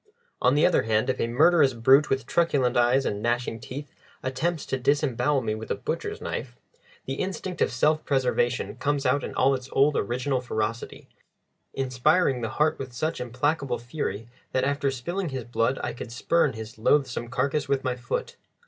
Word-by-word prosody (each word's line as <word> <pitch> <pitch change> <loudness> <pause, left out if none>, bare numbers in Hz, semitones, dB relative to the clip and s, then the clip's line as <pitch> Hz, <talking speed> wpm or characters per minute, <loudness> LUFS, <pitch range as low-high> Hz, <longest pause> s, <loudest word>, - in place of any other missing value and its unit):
On 130 - +4
the 150 - +4
other - - +4
hand, 110 +3 +1
if - - -6
a - - +1
murderous 145 +1 +4
brute 135 +6 +5
with 135 -2 0
truculent 140 -6 +1
eyes 120 +3 +3
and 105 0 -2
gnashing 120 0 -1
teeth 140 +4 -8 0.3
attempts 155 +5 -1
to 135 - -2
disembowel 140 +1 +1
me 110 -3 -1
with 110 +1 -7
a - - 0
butcher's - - -4
knife, - - -5 0.5
the 135 +1 -4
instinct 185 -2 -4
of - - +3
self 150 +6 +2
preservation 125 -5 0
comes 145 +1 -1
out 140 - +2
in - - -6
all 135 +1 +4
its 130 0 -4
old 140 +2 +3
original 125 +4 -1
ferocity, 115 -1 -4 0.7
inspiring 135 +2 +2
the 115 - -2
heart 155 +1 +2
with 130 -2 -6
such 155 +5 -2
implacable 130 +1 -1
fury 120 -4 -4 0.3
that 130 - +1
after 140 +1 +1
spilling 170 +8 -3
his 130 -3 -4
blood 120 +2 0
I - - -2
could 120 - -8
spurn 150 +4 +1
his 110 0 -9
loathsome 125 -1 +1
carcass 140 +3 -1
with 140 -1 +1
my 125 -1 -1
foot. 120 -1 -4
130 Hz, 180 wpm, -26 LUFS, 120-145 Hz, 0.7 s, brute